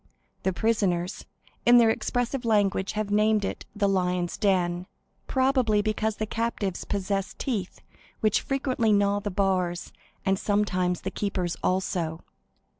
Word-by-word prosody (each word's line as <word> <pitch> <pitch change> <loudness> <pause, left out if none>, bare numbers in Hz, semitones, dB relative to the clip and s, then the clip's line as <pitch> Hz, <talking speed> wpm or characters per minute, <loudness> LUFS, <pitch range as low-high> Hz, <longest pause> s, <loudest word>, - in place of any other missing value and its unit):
The 190 - +1
prisoners, 185 -4 0 0.4
in 240 +1 +7
their 230 -2 +6
expressive 245 +3 -1
language, 205 -4 +1
have 215 -1 -2
named 210 0 +3
it - - -5
the 205 -1 +2
"Lions' 180 -2 0
Den," 180 -3 +1 0.4
probably 260 -6 +2
because 215 0 0
the 215 - -2
captives 220 -4 -2
possess 195 -1 -2
teeth 210 -9 -3 0.4
which 215 -2 +2
frequently 260 -5 0
gnaw 200 0 +3
the 205 - -3
bars, 185 -2 0 0.3
and 195 0 +2
sometimes 185 -4 0
the 190 - -4
keepers 185 -4 -2
also. 175 -3 -1
200 Hz, 130 wpm, -26 LUFS, 185-220 Hz, 0.4 s, in